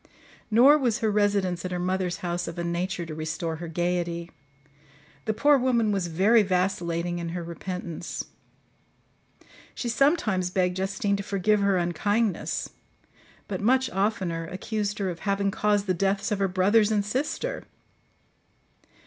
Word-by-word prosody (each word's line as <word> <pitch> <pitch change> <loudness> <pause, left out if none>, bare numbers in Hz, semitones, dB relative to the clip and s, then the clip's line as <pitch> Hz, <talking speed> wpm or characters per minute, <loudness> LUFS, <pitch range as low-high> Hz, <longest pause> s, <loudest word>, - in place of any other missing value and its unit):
Nor 260 +7 +6
was 240 -5 +1
her 220 -4 0
residence 200 -4 +1
at 185 - -3
her 180 - -3
mother's 180 -1 -1
house 175 0 -2
of 170 - -6
a 170 - -2
nature 175 +1 -2
to 160 - -7
restore 160 +1 -3
her 170 +1 -6
gaiety. 170 0 -2 0.9
The 220 - 0
poor 290 +3 +5
woman 235 -4 +2
was 195 -3 0
very 195 +8 +4
vacillating 180 -3 -1
in 170 -1 -4
her 175 - -4
repentance. 170 0 -5 1.5
She 240 - -3
sometimes 230 - +2
begged 180 0 0
Justine 195 +1 0
to - - -3
forgive 200 +2 +1
her 200 -1 +2
unkindness, 195 +4 0 0.8
but 190 -2 -4
much 260 +4 +2
oftener 185 -4 -1
accused 205 +3 -3
her 195 -3 -1
of 170 - -8
having 200 -1 0
caused 205 0 +1
the 185 - +1
deaths 195 +3 0
of 205 - 0
her 195 - +2
brothers 205 +4 +3
and 205 -2 +1
sister. 300 - -2
195 Hz, 150 wpm, -26 LUFS, 175-210 Hz, 1.5 s, Nor